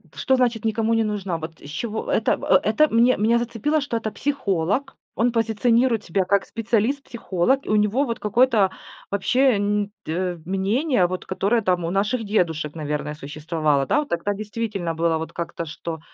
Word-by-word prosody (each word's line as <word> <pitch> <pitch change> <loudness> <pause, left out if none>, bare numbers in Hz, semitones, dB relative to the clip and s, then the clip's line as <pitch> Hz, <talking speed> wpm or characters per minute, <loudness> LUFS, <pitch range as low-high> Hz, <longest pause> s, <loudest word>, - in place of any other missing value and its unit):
что 265 - +2
значит 240 -4 +1
никому 225 +1 +1
не 225 - +3
нужна, 195 -5 -2
вот 160 0 -8
с 145 - -11
чего, 220 +8 -4
это - - +2
в - - -13
э - - +5
это 305 0 +3
мне 235 +2 +4
меня 230 +3 +3
зацепило, 240 +6 -1
что 275 -4 -2
это 220 -1 -3
психолог, 210 - -1 0.2
он 235 +2 +2
позиционирует 230 +1 +2
себя 190 +2 +1
как 200 +2 +1
специалист-психолог, 235 0 0
и - - -7
у 215 - +3
него 210 +7 +2
вот 230 -2 -3
какое-то 215 -1 +3 0.4
вообще 250 +6 +3
н 205 0 0
д 175 +2 -2
мнение, 195 - +1
вот 185 +1 -5
которое 205 +5 +1
там 180 -3 +1
у 165 - -2
наших 210 +5 0
дедушек, 165 -8 0
наверное, 150 -1 -3
существовало, 150 0 -1
да. 295 - +2
Вот 295 - -3
тогда 170 +4 -1
действительно 205 -4 -3
было 165 0 +1
вот 160 0 -6
как-то, 170 0 -4
что, 165 0 -6
210 Hz, 180 wpm, -23 LUFS, 175-235 Hz, 0.4 s, э